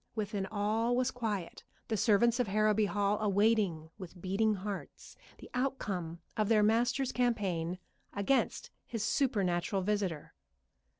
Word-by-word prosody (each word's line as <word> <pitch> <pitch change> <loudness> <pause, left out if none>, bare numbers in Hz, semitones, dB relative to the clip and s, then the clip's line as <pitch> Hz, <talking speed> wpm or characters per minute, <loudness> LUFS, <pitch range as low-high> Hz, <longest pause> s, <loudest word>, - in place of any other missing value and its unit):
Within 205 -3 -2
all 220 +4 0
was 255 +1 +1
quiet, 215 -8 -4 0.2
the 225 - 0
servants 230 +3 +3
of 245 - +1
Harrowby 215 +1 +3
Hall 205 0 +1
awaiting 200 -6 +2
with 185 -1 -9
beating 200 +4 +1
hearts 200 +1 -7 0.2
the - - -12
outcome 200 -10 -2 0.2
of 215 -1 0
their 215 -2 +5
master's 240 +4 +2
campaign 190 -9 0 0.3
against 205 +7 0 0.2
his 230 -3 -3
supernatural 195 -8 +1
visitor. 195 -6 -2
210 Hz, 125 wpm, -32 LUFS, 190-230 Hz, 0.3 s, their